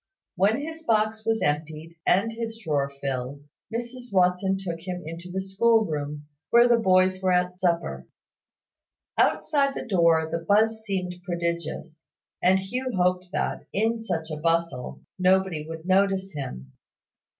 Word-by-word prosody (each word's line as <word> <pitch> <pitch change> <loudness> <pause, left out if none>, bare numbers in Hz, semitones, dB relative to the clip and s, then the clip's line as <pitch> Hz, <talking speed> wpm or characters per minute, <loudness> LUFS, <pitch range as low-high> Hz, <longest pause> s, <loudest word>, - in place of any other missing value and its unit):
When 205 +7 +3
his 320 +2 -6
box 220 -4 +1
was 225 0 +1
emptied, 155 +2 -2
and 200 +5 +3
his 225 0 -5
drawer 150 -10 -1
filled, 140 0 -4 0.3
Mrs 240 +1 -5
Watson 185 +1 +2
took 175 -4 -5
him 180 +1 -5
into 165 +3 -7
the 190 +2 -3
school 220 +4 +3
room, 150 -2 -4 0.2
where 235 +1 +6
the 235 -1 +4
boys 185 -2 +3
were 185 -1 +2
at 180 0 0
supper. 175 -2 -1 1.1
Outside 280 -3 +2
the - - -4
door 170 -6 +3
the 165 - -1
buzz 220 +4 +2
seemed 185 -3 -2
prodigious, 170 -2 -3 0.4
and 185 +1 +5
Hugh 250 +7 -3
hoped 180 0 +1
that, - - -2
in 225 +3 +1
such 165 -8 -3
a 155 - -3
bustle, 165 -5 -1 0.2
nobody 185 -4 +2
would 165 0 -7
notice 195 0 +2
him. 65 - -7
185 Hz, 145 wpm, -26 LUFS, 165-220 Hz, 1.1 s, where